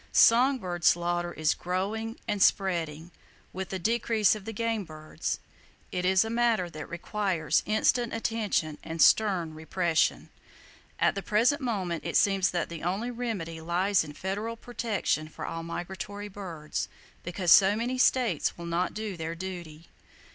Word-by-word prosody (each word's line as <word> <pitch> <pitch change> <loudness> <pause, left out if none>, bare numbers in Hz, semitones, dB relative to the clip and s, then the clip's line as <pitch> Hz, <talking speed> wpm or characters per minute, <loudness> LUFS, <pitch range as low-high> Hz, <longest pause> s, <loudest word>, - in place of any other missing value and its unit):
Song 255 +4 +6
bird 175 -6 -5
slaughter 175 0 +2
is 155 -2 +1
growing 210 +6 -3
and 205 -1 -1
spreading, 170 -5 +1 0.4
with 190 0 -5
the 190 - -3
decrease 220 +1 +2
of 210 -2 -7
the 225 - -4
game 225 -1 -1
birds! 155 -2 -5 0.5
It 180 0 -2
is 190 +3 +4
a - - -4
matter 230 -7 +1
that 155 -1 -8
requires 170 -4 0
instant 230 +2 +2
attention 215 -9 -1
and 165 0 -6
stern 185 -5 +4
repression. 160 +1 0 0.7
At - - +3
the 195 - -4
present 235 +10 +2
moment 190 -9 -2
it - - +1
seems 195 -2 +3
that 175 -1 -1
the 170 -2 -7
only 195 +8 -2
remedy 200 -10 -4
lies 180 +4 +2
in 150 -2 -9
federal 205 +7 -4
protection 220 -10 -2
for 155 - -7
all 165 - -4
migratory 190 +4 -6
birds,—because 175 0 -4
so 195 +1 +7
many 245 +3 -2
states 240 - +2
will 170 - -7
not 170 +2 -1
do 215 -2 -4
their 165 0 -4
duty. 170 -3 -7
190 Hz, 150 wpm, -28 LUFS, 170-220 Hz, 0.7 s, so